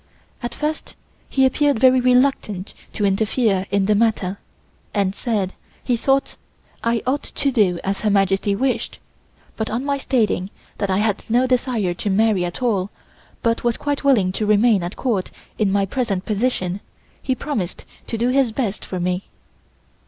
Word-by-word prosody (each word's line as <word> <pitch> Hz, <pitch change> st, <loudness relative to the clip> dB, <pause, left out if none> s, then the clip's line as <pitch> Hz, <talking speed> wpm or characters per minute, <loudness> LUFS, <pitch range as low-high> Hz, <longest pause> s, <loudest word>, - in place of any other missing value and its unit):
At 240 Hz, -1 st, -4 dB
first 305 Hz, +1 st, -3 dB, 0.3 s
he 265 Hz, -1 st, +3 dB
appeared 285 Hz, 0 st, +2 dB
very 260 Hz, +1 st, +6 dB
reluctant 250 Hz, -6 st, +2 dB, 0.2 s
to 210 Hz, -, 0 dB
interfere 200 Hz, 0 st, +1 dB
in 200 Hz, -1 st, +2 dB
the 210 Hz, -, +3 dB
matter, 205 Hz, -3 st, +1 dB, 0.6 s
and 195 Hz, -2 st, +1 dB
said 205 Hz, -5 st, -1 dB, 0.3 s
he 245 Hz, -, +1 dB
thought 270 Hz, +3 st, +1 dB, 0.5 s
I 230 Hz, -1 st, +1 dB
ought 270 Hz, +3 st, +1 dB
to 280 Hz, -, -1 dB
do 195 Hz, -8 st, +2 dB
as 195 Hz, +1 st, -2 dB
Her 215 Hz, -, +1 dB
Majesty 195 Hz, 0 st, +2 dB
wished, 255 Hz, +4 st, -1 dB, 0.6 s
but 220 Hz, -, -2 dB
on 240 Hz, +5 st, -2 dB
my 280 Hz, -1 st, 0 dB
stating 215 Hz, -8 st, 0 dB, 0.3 s
that 200 Hz, -2 st, -1 dB
I 190 Hz, -, +2 dB
had 210 Hz, -1 st, 0 dB
no 245 Hz, +3 st, +3 dB
desire 245 Hz, -7 st, 0 dB
to 190 Hz, +4 st, -3 dB
marry 205 Hz, -1 st, +3 dB
at 175 Hz, +8 st, -4 dB
all, 200 Hz, -5 st, +1 dB, 0.5 s
but 230 Hz, 0 st, +1 dB
was 240 Hz, -1 st, +1 dB
quite 290 Hz, -1 st, -2 dB
willing 230 Hz, -10 st, +4 dB
to 210 Hz, +3 st, -2 dB
remain 210 Hz, -1 st, +4 dB
at 175 Hz, +3 st, -4 dB
Court 220 Hz, -8 st, -1 dB, 0.3 s
in 210 Hz, -3 st, +2 dB
my 200 Hz, 0 st, +2 dB
present 200 Hz, -3 st, -2 dB
position, 205 Hz, -4 st, -1 dB, 0.4 s
he 260 Hz, -, 0 dB
promised 230 Hz, -, -4 dB, 0.2 s
to 230 Hz, -, -3 dB
do 240 Hz, +2 st, +1 dB
his 260 Hz, -2 st, +3 dB
best 215 Hz, -4 st, -2 dB
for 185 Hz, -, -5 dB
me. 180 Hz, +2 st, -1 dB
220 Hz, 165 wpm, -21 LUFS, 195-255 Hz, 0.6 s, very